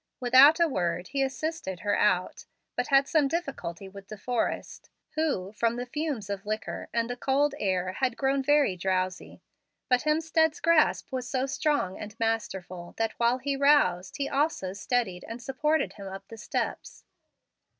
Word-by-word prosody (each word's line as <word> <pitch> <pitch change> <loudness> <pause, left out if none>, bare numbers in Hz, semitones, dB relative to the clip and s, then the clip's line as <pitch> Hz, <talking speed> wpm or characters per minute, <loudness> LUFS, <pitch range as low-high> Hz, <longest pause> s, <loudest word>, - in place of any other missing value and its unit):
Without 260 +6 +7
a 340 - +5
word 175 - -2
he 275 - -1
assisted 270 - -3
her 205 0 +1
oat, 185 -3 +1 0.3
but - - -1
had 275 0 +4
some 305 -3 +3
difficulty 275 - -4
with 195 0 -12
De 215 - -8
Forrest, 240 +3 -3 0.2
who, 290 -12 -1
from 230 +2 0
the 245 +1 -4
fumes 285 -5 -3
of 200 -1 -4
liquor 215 +1 -4
and 230 0 0
the 245 - -4
cold 275 +3 +1
air, 185 -2 0
had 250 +2 -1
grown 270 0 +1
very 285 -7 +3
drowsy. 185 0 -2 0.5
But 250 -1 +4
Hemstead's 320 +1 +1
grasp 330 -3 +3
was 255 -1 -3
so 260 -1 0
strong 285 -8 -1
and 210 +1 -9
masterful, 190 -6 -3
that 225 -1 0
while 235 +1 +3
he 275 +2 -2
roused, 270 -11 +3
he 280 -1 -1
also 280 - 0
steadied 205 -3 -1
and 230 +1 -6
supported 300 +6 0
him 200 -2 -9
up 195 +1 -9
the 225 - -9
steps. - - -4
245 Hz, 165 wpm, -28 LUFS, 195-285 Hz, 0.5 s, Without